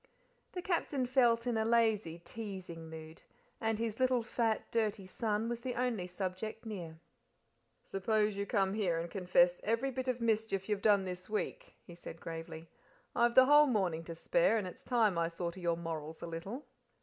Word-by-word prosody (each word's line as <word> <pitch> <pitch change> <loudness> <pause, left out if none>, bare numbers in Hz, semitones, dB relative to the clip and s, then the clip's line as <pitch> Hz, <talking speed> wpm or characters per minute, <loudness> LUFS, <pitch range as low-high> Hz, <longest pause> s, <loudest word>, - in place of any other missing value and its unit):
The 360 - -4
Captain 300 -7 0
felt 240 -2 +3
in 240 -2 0
a 220 - +2
lazy, 220 -7 +2
teasing 185 -6 -7
mood, 160 0 -10 0.4
and 225 -1 0
his 225 0 -3
little 255 -2 +3
fat, 225 -1 0
dirty 215 -4 0
son, 215 +3 -1
was 235 0 -2
the 250 +1 -4
only 235 -7 -1
subject 190 +5 -4
near. 175 -7 -6 0.9
"Suppose 210 +2 +1
you 200 0 -3
come 195 -3 +2
here 190 -6 +1
and 165 0 -4
confess 180 -2 +3
every 230 +5 +1
bit 260 0 -4
of 250 -1 0
mischief 220 -4 0
you've 210 -2 -1
done 200 -3 +4
this 180 +1 -6
week," - - -3
he 175 - -11
said 170 -1 -9
gravely. 165 0 -7 0.5
"I've 235 0 +3
the 260 - +9
whole 295 +2 +7
morning 185 -9 0
to 165 - -6
spare, - - +3
and 210 - -1
it's 180 - -9
time 220 -8 +2
I 165 - +2
saw 170 +1 -3
to 185 - -11
your 170 -2 0
morals 160 -2 -5
a - - -2
little." 170 - -6
210 Hz, 185 wpm, -34 LUFS, 175-235 Hz, 0.9 s, the